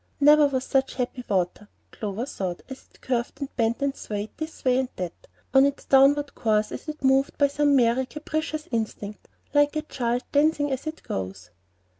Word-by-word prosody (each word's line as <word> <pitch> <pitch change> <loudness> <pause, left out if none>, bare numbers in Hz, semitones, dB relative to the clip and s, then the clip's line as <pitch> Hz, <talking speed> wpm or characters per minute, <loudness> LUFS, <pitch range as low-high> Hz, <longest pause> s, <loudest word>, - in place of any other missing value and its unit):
Never 295 +1 +7
was 260 -2 -1
such 270 0 0
happy 250 0 -3
water, 190 +1 -1 0.2
Clover 210 +2 -4
thought, 185 -9 -4
as 265 -1 -10
it - - -25
curved 245 -2 -2
and 280 -2 -6
bent 230 +2 0
and 280 0 0
swayed 210 0 -5
this 315 -2 -7
way 255 0 +4
and 260 -1 -1
that 180 -2 -6 0.3
on 270 0 +7
its 280 0 0
downward 280 +1 +4
course 215 -1 +1
as - - -7
if 300 -2 -7
moved 270 +1 +3
by 285 - +5
some 290 0 +2
merry, 250 0 +3
capricious 310 +1 -4
instinct, 215 -2 -4 0.3
like 290 0 +4
a 305 - -1
child 245 -4 -2
dancing 290 0 +2
as 265 +3 -3
it 315 +1 -6
goes. 95 -1 -5
265 Hz, 185 wpm, -25 LUFS, 225-290 Hz, 0.3 s, Never